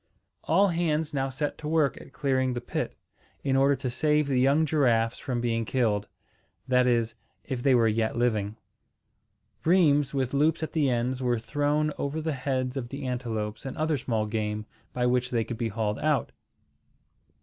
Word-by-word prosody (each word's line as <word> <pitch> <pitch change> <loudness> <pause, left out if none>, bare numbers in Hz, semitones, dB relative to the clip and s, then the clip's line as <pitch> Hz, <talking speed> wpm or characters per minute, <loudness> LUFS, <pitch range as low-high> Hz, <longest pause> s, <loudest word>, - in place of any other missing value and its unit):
All 195 +5 +4
hands 160 -2 0
now 135 -1 0
set 145 +3 -3
to 150 - -5
work 155 -3 +1
at - - -14
clearing 130 -3 0
the - - -1
pit, 120 - -4 0.5
in 135 -1 +1
order 135 +1 +4
to 130 -2 -4
save 150 +2 +2
the 135 -3 +1
young 140 +5 +4
giraffes 120 -7 +2
from 125 -3 -2
being 115 -1 0
killed; 110 -4 0 0.6
that 125 -1 +3
is, 115 -2 +1 0.3
if 130 -4 -4
they 135 0 +4
were 115 -2 +4
yet 110 +1 0
living. 110 -4 0 1.1
Rheims 150 -5 +4
with 135 -2 -1
loops 155 +3 +2
at 160 - -4
the 150 -4 +2
ends 125 +2 -1
were 120 -1 +1
thrown 145 +6 0
over 140 +3 -2
the 160 0 -2
heads 130 -1 -2
of 125 -3 -4
the 140 +1 -6
antelopes 115 -4 -3
and 135 - -6
other 155 -2 0
small 110 -4 -1
game, 105 0 -2 0.3
by 125 -1 -1
which 125 0 +1
they 115 -2 +1
could 120 +1 -6
be 115 -2 0
hauled 105 0 -2
out. 150 -2 +1
130 Hz, 180 wpm, -27 LUFS, 120-145 Hz, 1.1 s, All